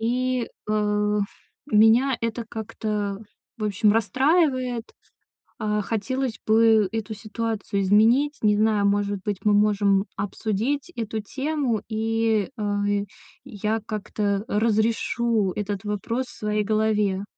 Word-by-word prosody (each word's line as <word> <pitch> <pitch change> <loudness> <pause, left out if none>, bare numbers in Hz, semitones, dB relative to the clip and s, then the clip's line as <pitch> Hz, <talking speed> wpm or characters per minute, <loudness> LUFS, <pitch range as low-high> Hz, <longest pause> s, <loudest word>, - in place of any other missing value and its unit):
И, 250 +1 0 0.2
э, 210 0 +1 0.5
у - - +4
меня 235 +4 +5
это 230 +1 -2
как-то, 210 -3 -3 0.4
в 215 - -3
общем, 210 0 +2
расстраивает. 255 - +1 0.7
А, 210 0 0
хотелось 240 +4 -2
бы 220 -1 +5
эту 220 0 -3
ситуацию 215 -1 -3
изменить. 230 +9 +4
Не 210 -1 +4
знаю, 215 -2 +3
может 200 -1 0
быть, 205 -2 -2
мы 210 -1 +4
можем 205 -1 +3
обсудить 225 - -2
эту 220 -1 -3
тему, 270 -1 -2
и, 225 -1 0
э, 205 -1 -1 0.7
я 220 -3 -2
как-то 205 -1 -2
разрешу 220 -1 +1
этот 205 -1 -3
вопрос 230 +5 -2
в - - -14
своей 210 0 0
голове. 210 -2 +1
215 Hz, 115 wpm, -24 LUFS, 205-230 Hz, 0.7 s, меня